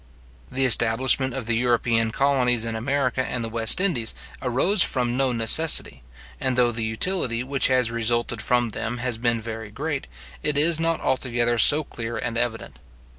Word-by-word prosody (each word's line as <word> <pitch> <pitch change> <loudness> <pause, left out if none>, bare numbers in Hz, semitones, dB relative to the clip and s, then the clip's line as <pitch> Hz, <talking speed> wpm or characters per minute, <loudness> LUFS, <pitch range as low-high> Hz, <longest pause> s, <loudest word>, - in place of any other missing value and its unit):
The 135 +1 +1
establishment 125 +2 +2
of 130 -4 -6
the 115 0 -1
European 115 -1 0
colonies 125 -2 +1
in 115 -1 -4
America 130 +2 -2
and 125 -2 -5
the 115 - -4
West 115 +5 +2
Indies 155 -13 0 0.3
arose 135 - +1
from 125 -2 +4
no 130 0 0
necessity; 115 - +4 0.4
and 130 -1 -2
though 120 -1 +3
the 115 -1 -3
utility 115 - -2
which 135 +1 0
has 125 -3 +1
resulted 115 0 -2
from 120 0 +1
them 115 +3 -5
has 120 -2 -2
been 120 -1 0
very 110 -1 -8
great, 140 +5 -5 0.3
it 150 -1 -1
is 160 +2 +3
not 165 0 -2
altogether 120 -2 -1
so 150 +7 +5
clear 115 -4 -7
and 120 0 -5
evident. 115 -1 -4
120 Hz, 170 wpm, -22 LUFS, 115-135 Hz, 0.4 s, so